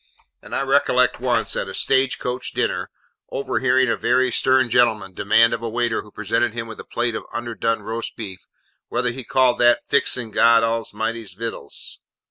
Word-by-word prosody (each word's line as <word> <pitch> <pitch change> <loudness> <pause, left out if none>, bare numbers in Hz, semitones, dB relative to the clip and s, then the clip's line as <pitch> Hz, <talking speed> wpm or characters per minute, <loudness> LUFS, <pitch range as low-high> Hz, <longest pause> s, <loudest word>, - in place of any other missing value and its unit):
And - - -7
I - - 0
recollect - - +2
once, - - 0
at - - -2
a - - -6
stage 135 -1 +2
coach 125 0 -4
dinner, - - -1 0.4
overhearing 130 -1 +1
a 115 - +1
very 130 +1 +2
stern 130 +1 +3
gentleman 115 -5 +2
demand 115 +5 +3
of 115 - -3
a 115 - -3
waiter 120 0 -1
who 105 - -15
presented 110 +2 -1
him 115 -1 -4
with 110 - -9
a - - -7
plate 120 0 -2
of - - -4
underdone 115 -1 -2
roast 115 +1 -5
beef, 95 -5 -8 0.4
'whether 125 -1 0
he 130 +2 -6
called 130 +1 +2
that, 120 0 +4
fixing 125 -4 +1
God 115 +2 +5
A'mighty's 115 -2 -2
vittles? 115 +4 -5
115 Hz, 175 wpm, -22 LUFS, 115-125 Hz, 0.4 s, God